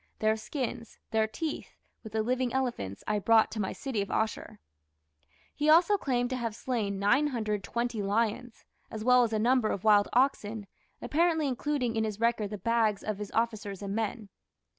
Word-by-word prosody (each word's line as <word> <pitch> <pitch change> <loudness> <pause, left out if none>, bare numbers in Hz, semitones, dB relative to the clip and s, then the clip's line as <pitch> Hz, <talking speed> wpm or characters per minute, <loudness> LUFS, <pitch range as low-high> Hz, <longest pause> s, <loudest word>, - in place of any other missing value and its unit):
Their 215 0 +2
skins, 235 0 -5
their 220 -1 +2
teeth, 310 +8 -5 0.3
with 220 -2 -10
the 220 -1 +1
living 250 +1 0
elephants, 240 - -2
I 210 0 0
brought 225 +2 +4
to 220 - -5
my 190 - -1
city 260 -7 -3
of 200 - -4
Asshur." 220 0 -2 1.0
He 295 +1 0
also 340 +6 +6
claimed 250 -8 -1
to 255 - -1
have 230 -3 -3
slain 220 -6 -2
920 235 -1 0
lions, 225 +4 -1 0.2
as 215 -1 -6
well 250 +1 +6
as 230 - -1
a 220 - 0
number 240 0 +2
of 190 - -3
wild 205 -2 +5
oxen, 225 -5 +1 0.4
apparently 320 -1 +2
including 255 -2 -1
in 220 - +1
his 215 -1 -3
record 230 -3 +1
the 210 - -5
"bags" 225 -2 +1
of 215 -2 -3
his 210 -1 -5
officers 215 -4 -2
and 200 0 -3
men. 220 -1 -3
225 Hz, 175 wpm, -29 LUFS, 210-250 Hz, 1.0 s, also